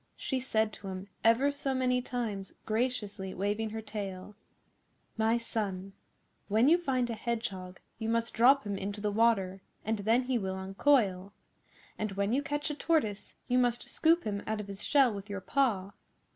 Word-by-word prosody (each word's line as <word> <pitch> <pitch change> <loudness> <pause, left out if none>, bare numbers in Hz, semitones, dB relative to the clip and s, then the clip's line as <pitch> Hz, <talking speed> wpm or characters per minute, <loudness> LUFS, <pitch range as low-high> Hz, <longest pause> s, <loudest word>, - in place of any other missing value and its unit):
She 265 - -2
said 220 -4 0
to 200 - -9
him 190 +1 -6
ever 235 +5 +4
so 280 -2 -2
many 250 -1 +2
times, 220 -6 -4
graciously 215 -4 -2
waving 205 +3 -1
her 220 +1 -5
tail, 205 -2 -6 0.8
'My 225 +1 +2
son, 195 -5 -3 0.5
when 220 +5 +4
you 340 +4 +6
find 255 -7 0
a - - -1
Hedgehog 205 -6 -4 0.2
you 220 -1 -2
must 230 0 0
drop 265 +5 +5
him 200 -2 -3
into 200 +2 -4
the 205 0 -1
water 200 -4 +2 0.2
and 220 0 0
then 225 +5 +3
he 250 -1 0
will 190 -2 -3
uncoil, 195 -1 +2 0.7
and 215 -2 -2
when 200 +3 0
you 275 - +2
catch 290 +1 -2
a - - -2
Tortoise 290 -10 0
you 250 -1 +3
must 245 -1 +1
scoop 330 +2 +3
him 200 -1 -2
out 215 0 -1
of 210 - -4
his 200 0 -6
shell 270 -6 +4
with 200 +1 -7
your 200 -1 -3
paw. 200 -4 0
220 Hz, 175 wpm, -31 LUFS, 200-250 Hz, 0.8 s, you